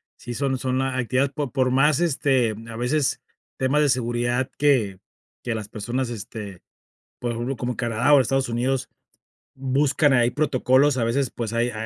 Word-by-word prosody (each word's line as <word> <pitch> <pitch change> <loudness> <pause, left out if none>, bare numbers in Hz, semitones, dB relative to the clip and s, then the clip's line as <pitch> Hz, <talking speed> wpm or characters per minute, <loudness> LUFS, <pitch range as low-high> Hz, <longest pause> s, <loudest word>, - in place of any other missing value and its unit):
sí 120 - -8
son 135 +1 -1
son 130 +1 -1
actividades 130 +1 0
por 145 -3 -4
por 130 -2 +1
más, 135 +4 +3
este 135 -8 +1
a 115 - -8
veces 130 +5 0 0.4
temas 135 +3 +2
de 145 - +2
seguridad 120 0 0
que 115 -10 +2 0.4
que 120 - -2
las 110 -2 -5
personas, 120 +5 -3
este 105 -4 -8 0.6
por 120 - -2
ejemplo, 120 +3 -3
como 125 +1 -3
Canadá 120 +4 +1
o 140 - +7
Estados 135 +1 0
Unidos 125 +3 -1 0.7
buscan 135 +2 +2
ahí 120 -2 +3
protocolos, 135 0 +2
a 115 - +1
veces, 125 +2 0
pues, 115 -2 -5
hay 120 +1 +1
hay - - -10
130 Hz, 165 wpm, -23 LUFS, 120-135 Hz, 0.7 s, o